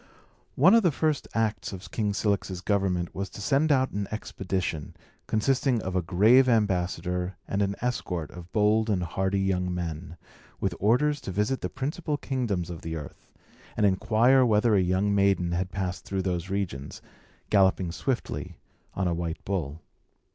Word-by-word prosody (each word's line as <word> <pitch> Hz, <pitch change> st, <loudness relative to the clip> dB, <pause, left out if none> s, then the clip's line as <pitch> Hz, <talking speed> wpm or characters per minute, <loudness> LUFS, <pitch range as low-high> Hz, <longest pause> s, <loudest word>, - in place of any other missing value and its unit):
One 175 Hz, +10 st, +6 dB
of 230 Hz, -, +7 dB
the 175 Hz, -5 st, +3 dB
first 155 Hz, 0 st, 0 dB
acts 110 Hz, -5 st, 0 dB
of 95 Hz, -1 st, -9 dB
King 105 Hz, -2 st, 0 dB
Cilix's 100 Hz, -3 st, -1 dB
government 95 Hz, -4 st, 0 dB
was 100 Hz, +1 st, -4 dB
to -, -, -11 dB
send 140 Hz, +8 st, +2 dB
out 130 Hz, -2 st, +3 dB
an 100 Hz, -1 st, -3 dB
expedition, 95 Hz, -7 st, -4 dB, 0.3 s
consisting 130 Hz, +2 st, +1 dB
of 95 Hz, 0 st, -3 dB
a 90 Hz, -, +2 dB
grave 110 Hz, +10 st, +5 dB
ambassador 90 Hz, -4 st, 0 dB
and 100 Hz, -, -1 dB
an 100 Hz, 0 st, 0 dB
escort 90 Hz, -10 st, -2 dB
of 90 Hz, 0 st, -11 dB
bold 110 Hz, +1 st, +2 dB
and 95 Hz, -4 st, +1 dB
hardy 95 Hz, +3 st, -1 dB
young 90 Hz, -2 st, 0 dB
men, 85 Hz, -1 st, -5 dB, 0.4 s
with 95 Hz, -2 st, -1 dB
orders 145 Hz, +8 st, +2 dB
to -, -, -5 dB
visit 105 Hz, +8 st, 0 dB
the -, -, -2 dB
principal 145 Hz, +3 st, -3 dB
kingdoms 110 Hz, -, -2 dB
of 85 Hz, -, -7 dB
the 80 Hz, 0 st, -5 dB
earth, 75 Hz, -3 st, -9 dB, 0.5 s
and 105 Hz, -, +3 dB
inquire 115 Hz, +7 st, +4 dB
whether 110 Hz, -1 st, +3 dB
a 100 Hz, -, +4 dB
young 95 Hz, +3 st, +1 dB
maiden 100 Hz, -3 st, +2 dB
had 90 Hz, +2 st, -1 dB
passed 95 Hz, -1 st, -3 dB
through 95 Hz, -1 st, -3 dB
those 90 Hz, -1 st, -2 dB
regions, 90 Hz, -9 st, -4 dB, 0.5 s
galloping 95 Hz, -3 st, +3 dB
swiftly 125 Hz, +8 st, -3 dB, 0.4 s
on 95 Hz, -1 st, 0 dB
a 85 Hz, -, +1 dB
white 85 Hz, -1 st, -4 dB
bull. 80 Hz, -5 st, -3 dB
100 Hz, 165 wpm, -27 LUFS, 90-110 Hz, 0.5 s, of